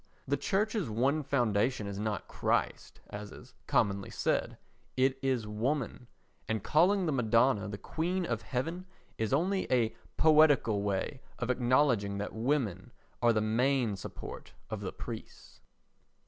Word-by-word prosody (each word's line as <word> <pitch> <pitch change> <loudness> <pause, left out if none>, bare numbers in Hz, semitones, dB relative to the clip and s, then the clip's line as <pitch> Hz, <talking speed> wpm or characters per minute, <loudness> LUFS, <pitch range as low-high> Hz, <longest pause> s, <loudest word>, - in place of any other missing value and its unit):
The - - +2
Church's 210 - 0
one 130 +8 +1
foundation 120 -4 +1
is 100 0 -5
not 105 -4 -2
Christ, - - -1
as 105 0 -7
is - - -13
commonly 100 -1 +1
said, - - -1 0.4
it 130 +1 +2
is 130 -4 0
woman; 120 +3 -2 0.4
and 110 -3 -1
calling 185 +5 +3
the 160 - +1
Madonna 115 -3 +3
the 100 -1 -5
Queen 175 - -2
of - - -2
Heaven 165 +8 -3 0.3
is 110 -1 -1
only 185 +7 +1
a 115 -3 +2 0.2
poetical 150 -9 +5
way 100 +6 -2 0.2
of 125 0 -1
acknowledging 120 -5 +2
that 105 +1 -4
women 115 -4 -1 0.3
are 120 -1 +5
the 110 -1 +1
main 120 +1 +1
support 95 - -8 0.2
of - - -3
the - - -4
priests. - - -9
125 Hz, 140 wpm, -31 LUFS, 105-145 Hz, 0.4 s, poetical